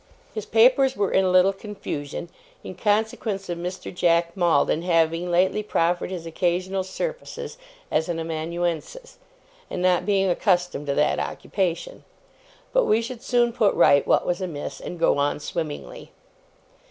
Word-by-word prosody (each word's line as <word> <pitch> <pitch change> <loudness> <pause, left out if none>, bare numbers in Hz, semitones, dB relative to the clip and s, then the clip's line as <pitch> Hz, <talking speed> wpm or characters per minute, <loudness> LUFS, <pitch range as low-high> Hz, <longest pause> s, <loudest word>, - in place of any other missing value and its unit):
His 215 -2 -5
papers 260 +4 +4
were 200 -1 0
in 190 - +3
a - - +2
little 185 +2 +5
confusion, 185 -7 -6 0.3
in - - -7
consequence 210 0 -1
of 175 - -2
Mr. 180 +2 -5
Jack 170 -1 +2
Maldon 175 -3 +2
having 165 0 +1
lately 185 +4 +2
proffered 175 -4 0
his 180 -3 -6
occasional 180 +3 -1
services 485 - -5 0.4
as 160 +2 +1
an 170 - -1
amanuensis, 170 - -4 0.5
and - - -4
not 180 +1 +2
being 195 -2 +2
accustomed 180 -5 +1
to 140 - 0
that 150 - +2
occupation; 190 - -3 0.7
but - - +4
we 215 - +3
should 235 +1 -6
soon 240 -1 +2
put 215 -4 +2
right 140 -4 +5
what - - +3
was 175 +1 -1
amiss, 160 -6 -5
and 175 - -6
go 165 -3 +2
on 145 +1 0
swimmingly. 165 - -6
180 Hz, 150 wpm, -24 LUFS, 170-210 Hz, 0.7 s, little